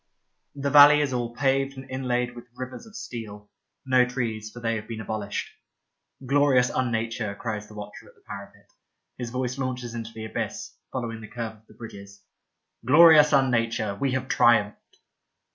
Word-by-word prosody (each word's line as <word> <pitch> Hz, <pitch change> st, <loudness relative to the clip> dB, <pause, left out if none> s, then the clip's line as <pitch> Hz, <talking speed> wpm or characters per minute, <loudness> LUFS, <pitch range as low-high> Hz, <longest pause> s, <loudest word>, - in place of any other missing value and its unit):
The 140 Hz, 0 st, -2 dB
valley 150 Hz, 0 st, +9 dB
is 145 Hz, -3 st, 0 dB
all 120 Hz, -1 st, -2 dB
paved 135 Hz, 0 st, 0 dB
and 135 Hz, 0 st, -9 dB
inlaid 125 Hz, -2 st, -2 dB
with 120 Hz, 0 st, -11 dB
rivers 130 Hz, -, -8 dB
of 220 Hz, -, -16 dB
steel. 105 Hz, -3 st, -8 dB, 0.3 s
No 130 Hz, -1 st, +4 dB
trees, 115 Hz, -4 st, -3 dB
for 120 Hz, -, -11 dB
they 115 Hz, -1 st, -1 dB
have 105 Hz, 0 st, -8 dB
been 115 Hz, -2 st, -6 dB
abolished. 105 Hz, -1 st, -4 dB, 0.4 s
" 135 Hz, -, -20 dB
Glorious 135 Hz, -2 st, +3 dB
unnature," 115 Hz, -4 st, -2 dB
cries 105 Hz, -1 st, -4 dB
the 105 Hz, -, -14 dB
watcher 105 Hz, 0 st, -9 dB
at -, -, -19 dB
the -, -, -28 dB
parapet. 100 Hz, 0 st, -10 dB, 0.5 s
His 120 Hz, -2 st, -4 dB
voice 125 Hz, +1 st, -3 dB
launches 125 Hz, -2 st, -3 dB
into 115 Hz, -1 st, -6 dB
the 110 Hz, -1 st, -7 dB
abyss, 110 Hz, -, -5 dB, 0.2 s
following 115 Hz, -3 st, -4 dB
the 110 Hz, -, -9 dB
curve 115 Hz, -1 st, -5 dB
of 110 Hz, -, -29 dB
the -, -, -18 dB
bridges. 100 Hz, -3 st, -11 dB, 0.3 s
'' -, -, -53 dB
Glorious 150 Hz, +3 st, +7 dB
unnature. 115 Hz, -6 st, +1 dB
We 135 Hz, -2 st, 0 dB
have 130 Hz, 0 st, -2 dB
triumphed." 110 Hz, -5 st, +2 dB
120 Hz, 175 wpm, -25 LUFS, 110-130 Hz, 0.5 s, valley